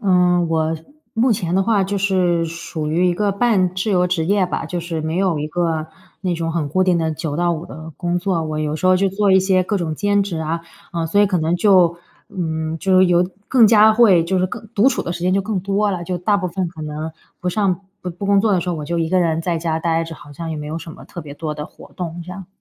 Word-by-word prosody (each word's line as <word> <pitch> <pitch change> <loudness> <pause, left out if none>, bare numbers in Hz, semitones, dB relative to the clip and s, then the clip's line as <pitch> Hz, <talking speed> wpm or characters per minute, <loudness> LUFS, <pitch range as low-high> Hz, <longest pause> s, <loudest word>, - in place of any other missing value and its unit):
嗯， 180 -4 +3
我 160 0 0
是 160 0 -11 0.3
目 235 +2 +3
前 180 -5 -2
的 195 - +3
话 210 -2 +2
就 200 +1 -2
是 185 -3 +1
属 165 -1 -5
于 175 +4 +2
一 175 - +1
个 205 +2 0
半 195 -4 +2
自 185 +3 -1
由 180 -2 +3
职 175 -2 0
业 200 +1 +3
吧， 180 - -3
就 175 +2 -3
是 165 -1 -4
没 160 +2 -3
有 185 -4 +1
一 150 - -2
个 165 -1 -1 0.3
那 180 -3 -1
种 165 0 -2
很 160 -3 -1
固 185 +5 +2
定 180 -2 +3
的 160 -1 0
9 155 -1 -4
到 175 +1 +1
5 165 0 -4
的 160 -1 -9
工 175 0 -1
作。 180 -3 -1
我 155 -1 -3
有 155 0 -1
时 160 - -7
候 185 0 +5
就 195 +1 +2
做 195 +1 +2
一 190 - +6
些 185 -1 +2
各 200 +2 -1
种 160 -3 -2
兼 205 +3 +2
职 190 -5 -4
啊， 160 +1 -2 0.3
嗯， 165 -1 -1
所 200 +6 +2
以 205 - +5
可 185 -2 0
能 165 +2 +1
就， 180 -3 +4 0.3
嗯， 160 -5 -3
就 190 +2 +3
是 185 - +6
有 175 0 +3 0.2
更 245 -4 +6
加 215 0 +6
会 215 -7 +5
就 190 +2 0
是 185 - +2
更 220 - -8
独 215 +6 +5
处 - - -1
的 170 - -3
时 175 - -7
间 180 +1 +1
就 195 - +2
更 205 0 -2
多 200 +2 0
了。 175 -2 -3
就 180 +1 -3
大 205 +4 +2
部 185 -2 -2
分 180 0 -2
可 160 -2 -10
能 155 +1 -5 0.3
不 180 - -2
上 190 -1 0 0.2
不 180 - -4
不 180 +4 -6
工 200 0 +4
作 220 -1 +2
的 185 - +2
时 180 - -5
候， 175 - 0
我 150 -2 -5
就 170 +3 -2
一 165 -1 0
个 185 +2 +2
人 165 -2 +1
在 170 0 -1
家 160 -1 -1
呆 165 0 0
着， 165 0 -8
好 145 - -14
像 165 +2 -5
也 155 - -3
没 150 - -6
有 155 +2 -4
什 165 -1 -9
么 - - -13
特 - - -8
别 145 -1 -9
多 150 +1 -4
的 150 0 -5
活 - - -15
动 175 -1 -5
这 175 - -10
样。 185 -1 -8
175 Hz, 295 characters per minute, -20 LUFS, 165-195 Hz, 0.3 s, 一